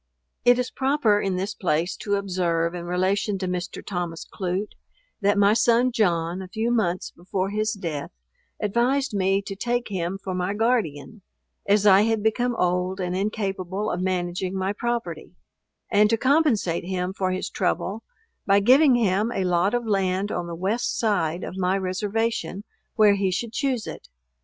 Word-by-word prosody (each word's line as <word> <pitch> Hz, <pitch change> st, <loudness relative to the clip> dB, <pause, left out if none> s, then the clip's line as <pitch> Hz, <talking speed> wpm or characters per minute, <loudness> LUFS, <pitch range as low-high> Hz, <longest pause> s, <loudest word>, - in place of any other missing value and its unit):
It 245 Hz, 0 st, +6 dB
is 250 Hz, 0 st, -2 dB
proper 265 Hz, -6 st, +2 dB
in 195 Hz, -1 st, -1 dB
this 195 Hz, +3 st, -2 dB
place 175 Hz, -2 st, 0 dB
to 205 Hz, -1 st, -1 dB
observe, 175 Hz, -4 st, 0 dB
in 175 Hz, -1 st, -6 dB
relation 190 Hz, +3 st, 0 dB
to 185 Hz, -1 st, -3 dB
Mr. 180 Hz, 0 st, -4 dB
Thomas 175 Hz, -4 st, -4 dB
Clute, 190 Hz, +2 st, -3 dB, 0.5 s
that 205 Hz, 0 st, +2 dB
my 205 Hz, +1 st, +5 dB
son 235 Hz, +2 st, +3 dB
John, 175 Hz, -5 st, 0 dB
a 190 Hz, -, -7 dB
few 220 Hz, +5 st, -1 dB
months 185 Hz, -7 st, 0 dB
before 185 Hz, +2 st, -3 dB
his 215 Hz, +1 st, 0 dB
death, 165 Hz, -8 st, -4 dB, 0.5 s
advised 240 Hz, +5 st, +1 dB
me 195 Hz, 0 st, +1 dB
to 195 Hz, -, -6 dB
take 240 Hz, +3 st, -2 dB
him 185 Hz, -1 st, -2 dB
for 195 Hz, -1 st, -5 dB
my 180 Hz, +2 st, -1 dB
guardian, 220 Hz, -, -1 dB, 0.5 s
(as 205 Hz, +1 st, +3 dB
I 195 Hz, -1 st, +7 dB
had 220 Hz, -1 st, +1 dB
become 240 Hz, +2 st, +1 dB
old 180 Hz, 0 st, 0 dB
and 180 Hz, -1 st, -2 dB
incapable 195 Hz, 0 st, -2 dB
of 180 Hz, -, -2 dB
managing 185 Hz, 0 st, -2 dB
my 190 Hz, +1 st, -1 dB
property,) 225 Hz, -8 st, -4 dB, 0.6 s
and 210 Hz, +1 st, +5 dB
to 225 Hz, -, +2 dB
compensate 255 Hz, -, +2 dB
him 185 Hz, 0 st, -2 dB
for 190 Hz, -1 st, -1 dB
his 185 Hz, +1 st, -2 dB
trouble 195 Hz, +2 st, -1 dB, 0.5 s
by 200 Hz, 0 st, +5 dB
giving 260 Hz, +6 st, +6 dB
him 215 Hz, -1 st, +1 dB
a 190 Hz, -, -1 dB
lot 180 Hz, +4 st, +2 dB
of 240 Hz, -1 st, -1 dB
land 195 Hz, -1 st, 0 dB
on 175 Hz, -, -3 dB
the 170 Hz, -, -5 dB
west 195 Hz, +7 st, -1 dB
side 180 Hz, -6 st, 0 dB
of 185 Hz, -, -6 dB
my 185 Hz, +1 st, +1 dB
reservation 200 Hz, 0 st, -2 dB, 0.3 s
where 210 Hz, -2 st, +6 dB
he 195 Hz, -1 st, +1 dB
should 220 Hz, +5 st, -3 dB
choose 255 Hz, -4 st, -1 dB
it. 60 Hz, -, -9 dB
195 Hz, 170 wpm, -24 LUFS, 180-220 Hz, 0.6 s, I